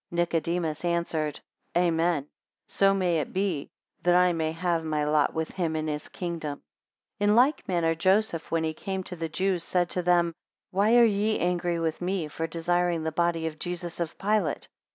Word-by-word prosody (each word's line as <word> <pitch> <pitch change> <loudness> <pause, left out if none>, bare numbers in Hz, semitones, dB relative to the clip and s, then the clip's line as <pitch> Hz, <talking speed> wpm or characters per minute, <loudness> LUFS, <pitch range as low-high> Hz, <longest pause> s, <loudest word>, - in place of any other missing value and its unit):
4 - - -8
Nicodemus 170 -1 0
answered, 170 -3 -1 0.4
Amen; 170 -3 +2 0.4
so 195 0 +3
may 180 -4 +1
it 150 - -4
be, 185 -7 -1 0.3
that 175 0 +3
I 180 0 +5
may 160 -1 -1
have 165 0 -1
my 155 -1 -1
lot 150 +1 +2
with 160 0 -2
him 170 -4 -2
in 155 0 -1
his 150 -1 -3
kingdom. 165 -5 -5 0.6
5 205 0 +2
In 210 - +5
like 265 +6 +3
manner 170 -3 +1
Joseph, 185 +1 +1
when 165 -1 0
he 160 0 -1
came 190 +3 -4
to 180 - -7
the 165 -1 -4
Jews, 185 +1 0
said 175 0 0
to 180 - 0
them, 175 -1 +3 0.4
Why 205 +4 +3
are 240 -1 +8
ye 215 0 +1
angry 175 -1 0
with 160 0 -2
me 180 -2 -1
for 165 +2 -3
desiring 175 0 0
the 160 - -1
body 170 0 0
of 155 -1 -4
Jesus 175 -1 -5
of 170 -2 -3
Pilate? 200 -6 0
170 Hz, 190 wpm, -27 LUFS, 160-180 Hz, 0.6 s, are